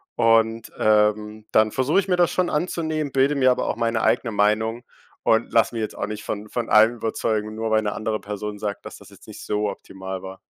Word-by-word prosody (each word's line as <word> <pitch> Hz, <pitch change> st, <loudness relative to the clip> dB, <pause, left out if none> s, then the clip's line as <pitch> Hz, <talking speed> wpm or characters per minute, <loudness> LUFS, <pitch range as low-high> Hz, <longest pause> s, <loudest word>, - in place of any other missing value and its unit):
Und, 115 Hz, -1 st, +2 dB
ähm, 105 Hz, 0 st, +1 dB
dann 110 Hz, 0 st, +3 dB
versuche 130 Hz, +8 st, +2 dB
ich 195 Hz, -, -2 dB
mir 185 Hz, -, +2 dB
das 175 Hz, -1 st, +2 dB
schon 180 Hz, -1 st, 0 dB
anzunehmen, 155 Hz, -2 st, -2 dB
bilde 135 Hz, +2 st, +2 dB
mir 130 Hz, -2 st, +4 dB
aber 125 Hz, -, -1 dB
auch -, -, -1 dB
meine 115 Hz, -1 st, 0 dB
eigene 115 Hz, -, +1 dB
Meinung 110 Hz, +3 st, +1 dB, 0.4 s
und 115 Hz, +1 st, +2 dB
lasse 115 Hz, +1 st, +2 dB
mich 115 Hz, -, -2 dB
jetzt 110 Hz, -, -5 dB
auch -, -, -2 dB
nicht 105 Hz, 0 st, -6 dB
von 105 Hz, 0 st, -5 dB
von 115 Hz, +1 st, -4 dB
allem 110 Hz, +2 st, +5 dB
überzeugen, 110 Hz, -1 st, -2 dB
nur 110 Hz, 0 st, -3 dB
weil 110 Hz, 0 st, +3 dB
'ne 105 Hz, -1 st, -2 dB
andere 110 Hz, 0 st, -3 dB
Person 105 Hz, 0 st, -5 dB
sagt, 105 Hz, -1 st, -5 dB
„dass -, -, -8 dB
das -, -, -15 dB
jetzt -, -, -18 dB
nicht -, -, -10 dB
so 105 Hz, 0 st, -1 dB
optimal 95 Hz, -1 st, -7 dB
war“. 95 Hz, 0 st, -8 dB
110 Hz, 220 wpm, -23 LUFS, 105-120 Hz, 0.4 s, allem